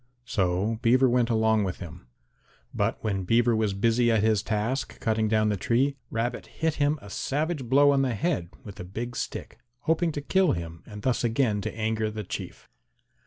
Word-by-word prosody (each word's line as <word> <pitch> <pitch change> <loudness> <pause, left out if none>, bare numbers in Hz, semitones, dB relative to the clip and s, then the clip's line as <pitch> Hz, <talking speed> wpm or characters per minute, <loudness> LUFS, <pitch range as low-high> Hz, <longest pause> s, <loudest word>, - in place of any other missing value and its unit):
So 100 0 0
Beaver 130 +2 +4
went 120 -1 +2
along 110 -2 +3
with 95 -2 -3
him. 85 -6 -10 0.7
But - - 0
when 100 -3 -1
Beaver 115 +4 +3
was 110 -3 0
busy 115 +3 +3
at 110 -2 +2
his 110 -3 +3
task 110 +5 -2
cutting 110 -1 +1
down 110 0 +2
the 105 - 0
tree, 130 +8 +1
Rabbit 115 +2 -2
hit 160 -1 -2
him 145 +1 +2
a 100 - -10
savage 150 - -2
blow 140 +4 +5
on 140 -1 +3
the 130 -4 0
head 145 - -1
with 100 - -10
a - - -4
big 115 +7 -6
stick - - -5 0.2
hoping 165 +4 +1
to 145 - -3
kill 190 +3 +2
him 85 -1 -6
and 105 -1 -9
thus 130 -2 +1
again 115 -3 +1
to 105 - -5
anger 110 0 0
the 110 0 -5
Chief. - - -7
115 Hz, 190 wpm, -27 LUFS, 105-130 Hz, 0.7 s, blow